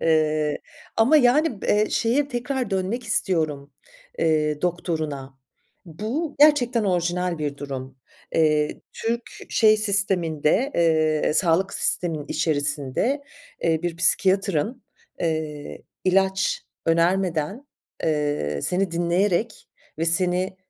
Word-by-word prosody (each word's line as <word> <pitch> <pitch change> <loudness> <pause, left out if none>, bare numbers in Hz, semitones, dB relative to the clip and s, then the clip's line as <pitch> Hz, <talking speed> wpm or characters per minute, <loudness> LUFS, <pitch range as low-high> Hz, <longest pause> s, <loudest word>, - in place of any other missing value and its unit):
Eee, 155 -2 +1 0.4
ama, 245 +8 +5
yani, 260 -3 +3
b - - -3
eee, 210 +1 +2
şeye 270 +5 +1
tekrar 245 -2 -3
dönmek 195 +6 -1
istiyorum, 155 -9 -1 0.5
eee, 150 -1 +1
doktoruna. 155 -6 -3 0.5
Bu 225 - -4
gerçekten 255 -6 +4
orijinal 180 -1 0
bir 145 -2 -3
durum. 135 -2 -7 0.4
Eee, 150 -2 +2
Türk 230 +1 -3 0.2
şey 215 -1 +5
sisteminde, 195 - +1
eee, 155 -3 +2
sağlık 185 +2 +2
sisteminin 160 -5 -1
içerisinde, 145 - -1 0.4
eee, 160 0 +1
bir 175 -1 -2
psikiyatrın, 195 - +1 0.4
eee, 155 -3 -3 0.2
ilaç 190 +1 +2 0.2
önermeden, 170 - +1 0.4
eee, 145 - -1
seni 185 0 0
dinleyerek 175 +5 0 0.3
ve 165 - 0
seni 180 +3 0
175 Hz, 100 wpm, -24 LUFS, 155-210 Hz, 0.5 s, ama